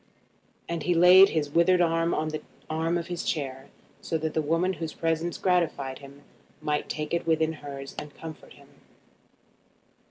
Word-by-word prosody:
And 170 -1 -3
he 175 +3 +1
laid 180 +3 +8
his 150 -3 -1
withered 175 +3 +4
hand 165 -1 +2
on 155 0 -1
the 155 0 -4 0.3
arm 165 +2 0
of 170 - -3
his 175 -1 -4
chair, 135 -3 -3 0.3
so 165 - -2
that 160 0 -3
the 160 - +1
woman 165 +5 +1
whose 165 -2 -6
presence 165 +1 -1
gratified 165 -8 0
him 140 +1 -14 0.4
might 150 -1 -2
take 150 +1 -4
it 170 -1 -1
within 160 0 +2
hers 140 -2 -8
and 150 -1 -10
comfort 160 -1 -10
him. - - -19
160 Hz, 165 wpm, -27 LUFS, 150-170 Hz, 0.4 s, laid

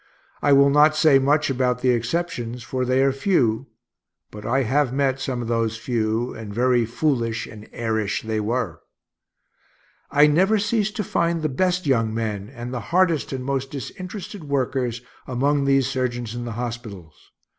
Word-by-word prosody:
I 145 - +3
will 140 0 +6
not 150 +2 +5
say 155 -3 +5
much 145 +2 +2
about 125 -1 0
the 125 0 +3
exceptions, 120 -1 -2
for 130 +3 -2
they 130 +1 +2
are 135 - +3
few 135 - +1 0.6
(but 105 0 -8
I 130 +3 +2
have 130 +2 +1
met 135 0 0
some 130 -2 -3
of - - -6
those 115 -1 0
few, 115 0 -1
and 110 -2 -8
very 120 +1 +2
foolish 115 -3 -1
and 105 0 -12
airish 110 -3 -2
they 110 -1 -2
were). 110 -4 -2 1.3
I 145 +1 +5
never 185 +8 +3
ceased 210 0 0
to 215 - -1
find 170 -2 0
the 155 - +1
best 180 +5 0
young 115 -5 +2
men, 105 -3 -3
and 125 -1 -7
the 125 - -2
hardest 170 -3 +2
and 130 -2 -4
most 135 -1 -2
disinterested 185 - -7
workers, 130 -4 -1 0.2
among 140 +2 +1
these 135 -1 +3
surgeons, 120 -3 -2
in 120 0 -5
the 115 - -5
hospitals. 110 -10 -7
130 Hz, 165 wpm, -23 LUFS, 115-145 Hz, 1.3 s, will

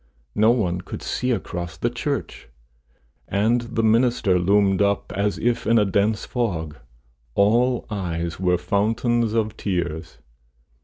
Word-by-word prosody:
No 110 +2 +4
one 95 -7 +1
could - - -8
see 125 - -2
across 90 -7 -3
the - - -1
church, - - -4 0.8
and 110 +5 +1
the 115 -1 -2
minister 110 -4 +3
loomed 100 +1 +3
up, 100 0 0
as 100 0 -1
if 120 0 -1
in 115 +1 +4
a 105 - +4
dense 100 +2 +1
fog; 85 - -3 0.6
all 120 +5 +3
eyes 85 -4 -3
were 90 -1 +2
fountains 110 +5 0
of 110 -2 0
tears. 85 -5 -3
105 Hz, 135 wpm, -23 LUFS, 90-115 Hz, 0.8 s, No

